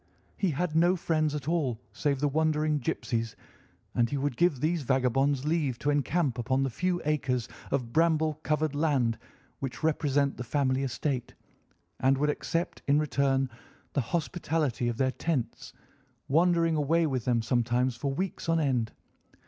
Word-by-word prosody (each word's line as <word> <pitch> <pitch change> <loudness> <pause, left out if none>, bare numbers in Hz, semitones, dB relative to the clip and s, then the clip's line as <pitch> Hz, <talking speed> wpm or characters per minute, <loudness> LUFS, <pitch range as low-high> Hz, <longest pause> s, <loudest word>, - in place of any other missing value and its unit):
He 195 - 0
had 155 +2 -1
no 175 +3 +4
friends 155 -3 0
at 145 -1 -5
all 145 -9 0
save 140 -2 0
the 145 - +3
wandering 155 0 +1
gipsies, 115 -3 -2 0.6
and 120 -1 +2
he 145 - -2
would 140 -2 -1
give 165 -3 +2
these 160 +4 0
vagabonds 135 +1 +1
leave 150 -6 0
to 145 - 0
encamp 145 -2 0
upon 130 +3 +1
the 135 - -1
few 180 +7 0
acres 135 -5 0 0.2
of 120 -4 -2
bramble 160 -2 +2
covered 155 -1 0
land 135 -7 +1 0.4
which 135 +3 -5
represent 145 -3 +1
the 125 - -4
family 130 +1 +1
estate, 130 0 -2 0.6
and 135 +1 +3
would 150 +2 +2
accept 165 +3 -3
in 140 +1 +4
return 140 -3 +1 0.5
the 140 - +2
hospitality 155 -3 -1
of 120 -1 -2
their 130 0 +2
tents, 140 -5 -3 0.6
wandering 165 +2 +3
away 160 +3 +2
with 130 -6 -1
them 120 -2 +2
sometimes 120 +2 +1
for 135 +4 -2
weeks 180 +3 -3
on 165 0 +3
end. 125 -7 0
145 Hz, 155 wpm, -29 LUFS, 130-160 Hz, 0.6 s, no